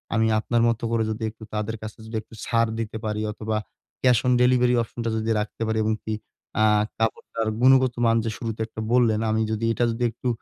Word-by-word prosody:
আমি 110 0 +3
আপনার 115 +1 +1
মতো 115 0 -2
করে 115 -1 +2
যদি 110 +1 -4
একটু 110 +1 -14
তাদের 105 +1 -2
কাছে 110 -1 -7
যদি 110 +1 -7
একটু 110 - -20
ছাড় 115 -1 +2
দিতে 110 -1 -3
পারি 105 0 -1
অথবা, 110 0 -2 0.5
ক্যাশ 125 -2 +5
অন 125 - +4
ডেলিভারি 125 0 +4
অপশনটা 115 0 -4
যদি 110 0 -2
রাখতে 105 +2 -5
পারি 110 0 0
এবং 110 0 +1
কি 110 - -3 0.5
আ - - +5 0.4
কাপড়টার 110 0 -1
গুণগত 130 -1 +5
মান 115 0 +4
যে - - 0
শুরুতে 115 -1 -4
একটা 110 0 -7
বললেন 115 -4 +4
আমি 110 - +1
যদি 110 +1 -1
এটা 120 - +1
যদি 115 +2 -3
একটু 125 - -6
115 Hz, 205 wpm, -24 LUFS, 110-120 Hz, 0.5 s, ক্যাশ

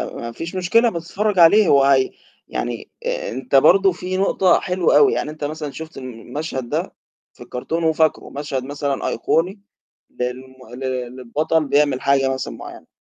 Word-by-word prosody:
ما 115 0 -6
فيش 165 +9 -7
مشكلة 205 +6 +3
بس 170 -3 -7
اتفرج 210 -2 0
عليه 195 +5 +7
هو 140 -3 +5
هي 135 -1 +3 0.4
يعني - - -4 0.2
أنت - - -3
برضو 195 +8 +6
في 185 +1 -4
نقطة 190 -2 +3
حلوة 180 -4 +2
أوي، 145 - +5
يعني - - -2
أنت 155 -1 -9
مثلًا 150 0 -4
شُفت 160 +3 -9
المشهد 130 +1 -6
ده - - -2 0.4
في - - -12
الكرتون 165 +7 -4
وفاكره، 160 -1 +1
مشهد 140 -2 -4
مثلًا 140 0 -3
أيقوني 185 +5 0 0.6
للم 125 +1 -3 0.3
لل 130 -1 -4
للبطل 155 +6 0
بيعمل 140 -1 +2
حاجة 135 -1 +2
مثلًا 130 - -5
معيّنة. - - -11
150 Hz, 155 wpm, -20 LUFS, 130-175 Hz, 0.6 s, عليه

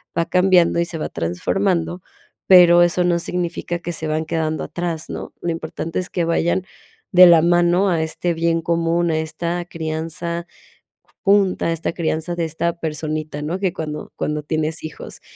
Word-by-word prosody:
va 170 - +1
cambiando 180 -2 +3
y 170 - +2
se 170 -1 -6
va - - -2
transformando, 170 - -1 0.5
pero 175 -2 +8
eso 175 +1 +2
no 175 -1 +2
significa 175 0 -3
que 175 0 -5
se 160 - -4
van 155 +1 -1
quedando 155 -1 -2
atrás, 170 -2 -4
¿no? - - -7
Lo 175 - -2
importante 165 0 -4
es 185 - -4
que 175 - 0
vayan 170 +2 +1 0.5
de 180 0 +9
la 170 -2 +7
mano 175 +3 +3
a 165 -3 +1
este 170 +2 -2
bien 165 0 +1
común, 170 +1 0
a 160 - +1
esta 170 +2 -3
crianza 165 +1 -4 0.8
junta, 195 -4 +3
esta 165 0 -2
crianza 165 0 -2
de 170 -1 -1
esta 170 +2 -2
personita, 155 -1 -4
¿no?, 170 +5 -3
que 190 -3 0
cuando 150 -1 -6
cuando 150 0 -2
tienes 155 +1 -2
hijos. 155 - -8
170 Hz, 170 wpm, -20 LUFS, 160-175 Hz, 0.8 s, de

